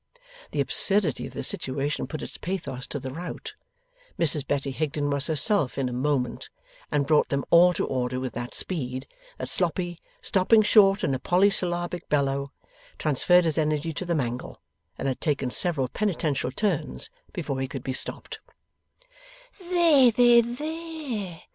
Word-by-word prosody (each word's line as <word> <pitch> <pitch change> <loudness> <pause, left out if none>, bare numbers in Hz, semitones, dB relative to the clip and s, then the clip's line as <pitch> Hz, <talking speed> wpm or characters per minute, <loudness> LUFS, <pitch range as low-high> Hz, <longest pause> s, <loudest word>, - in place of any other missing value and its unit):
The - - -1
absurdity 195 - +2
of - - -12
the - - -4
situation 140 +3 -1
put 155 - -6
its - - -7
pathos 165 -8 -4
to - - -4
the 130 -1 -6
rout. 170 +6 -7 0.6
Mrs 150 -4 +3
Betty 140 -1 -1
Higden 145 0 -2
was 140 +1 0
herself 160 - +1
in 135 -2 0
a 125 - -4
moment, 130 0 -1 0.4
and 145 -1 +1
brought 150 +1 +3
them 140 0 -1
all 175 +1 +7
to - - -1
order 125 -1 -2
with 130 -2 -4
that 120 0 -6
speed, 130 -7 -3 0.3
that 130 - -5
Sloppy, 175 +3 -1 0.2
stopping 215 +3 +4
short 200 -2 +5
in 135 - +1
a 130 - -2
polysyllabic 180 -1 +1
bellow, 140 -1 0 0.5
transferred 175 +4 +3
his 160 -1 0
energy 155 +1 -1
to 170 - -4
the 170 - 0
mangle, 125 -4 -4 0.4
and - - -3
had 130 - -3
taken 140 -4 -1
several 150 -6 0
penitential 155 -8 -1
turns 145 - 0 0.2
before 135 -1 -4
he 135 - -2
could 130 -1 -7
be 130 - -3
stopped. - - -4 1.3
'There, 330 -8 +5
there, 240 +1 +6
there! 275 - -5
155 Hz, 155 wpm, -26 LUFS, 135-190 Hz, 1.3 s, all